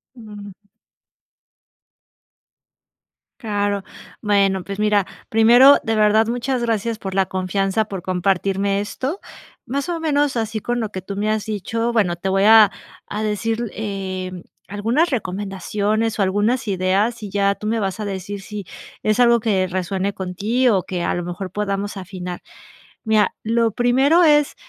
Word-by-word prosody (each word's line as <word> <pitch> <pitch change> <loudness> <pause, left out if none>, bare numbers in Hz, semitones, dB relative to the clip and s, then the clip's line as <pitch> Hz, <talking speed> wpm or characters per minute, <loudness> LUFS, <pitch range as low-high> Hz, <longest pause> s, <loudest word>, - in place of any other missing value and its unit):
Mm. 205 -4 -10 2.9
Claro. 205 -2 -1 0.4
Bueno, 195 -3 +2
pues 200 +1 -7
mira, 210 -2 +2 0.2
primero, 240 +5 +7
de 225 -2 0
verdad, 215 +1 +4
muchas 245 +1 -2
gracias 225 -1 -1
por 190 -3 -6
la 190 -1 +1
confianza, 195 +3 -1
por 195 -3 -6
compartirme 195 +2 0
esto, 260 - -4 0.5
más 280 +7 -2
o 335 -1 -2
menos 290 -4 +1
así 220 -1 -2
con 240 +3 -2
lo 220 -2 -2
que 185 -1 -6
tú 200 +1 -6
me 210 +2 -1
has 215 -1 -1
dicho. 225 +3 -2
Bueno, 185 -6 +2
te 190 +3 -3
voy 195 +1 +2
a 215 -2 +8 0.3
a 210 - -5
decir, 225 +2 -2
eh, 190 -3 -4 0.4
algunas 230 - 0
recomendaciones 205 +1 -2
o 200 - +2
algunas 210 +5 0
ideas 195 +5 0
y 205 - -6
ya 200 0 +1
tú 210 - -7
me 225 +1 0
vas 195 +1 -2
a 210 - -3
decir 195 0 -5
si 205 -1 -7 0.4
es 215 +3 +1
algo 235 -1 +5
que 195 -4 +1
resuene 190 +2 -2
con 185 -1 -5
ti 230 +7 +1
o 195 -4 +3
que 175 0 -4
a - - 0
lo 175 - -3
mejor 180 +1 -6
podamos 205 0 -3
afinar. 180 -1 -7 0.6
Mira, 215 -3 +2
lo 230 0 +1
primero 265 - +3
es, 295 -1 +4
205 Hz, 155 wpm, -20 LUFS, 195-230 Hz, 2.9 s, a